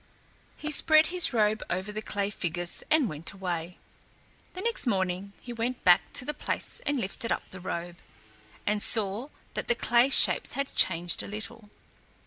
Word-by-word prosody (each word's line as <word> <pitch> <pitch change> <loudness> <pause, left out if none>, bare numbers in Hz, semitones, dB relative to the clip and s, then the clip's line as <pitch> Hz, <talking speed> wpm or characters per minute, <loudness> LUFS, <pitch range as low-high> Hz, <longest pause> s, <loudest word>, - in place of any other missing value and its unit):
He 305 - -5
spread 310 +1 +4
his 360 -2 +4
robe 215 -2 +2
over 185 +3 -3
the 215 +1 -5
clay 205 -1 -3
figures 175 -2 -3
and 305 -5 +4
went 155 0 -6
away. 180 -2 -4 0.8
The 370 - -5
next 465 - -2
morning 190 -2 -1
he 240 - -7
went 235 +2 -3
back 175 -1 +4
to 250 - +2
the 300 - -2
place - - -3
and 285 -2 +1
lifted 230 +2 -4
up - - -1
the 190 - -9
robe, 175 -1 -5 0.7
and 210 0 +1
saw 215 +3 +2 0.3
that - - -4
the 240 - +2
clay 240 +2 +3
shapes - - +6
had 275 0 -3
changed 175 -1 +2
a - - -8
little. 215 +1 -6
210 Hz, 170 wpm, -28 LUFS, 185-250 Hz, 0.8 s, shapes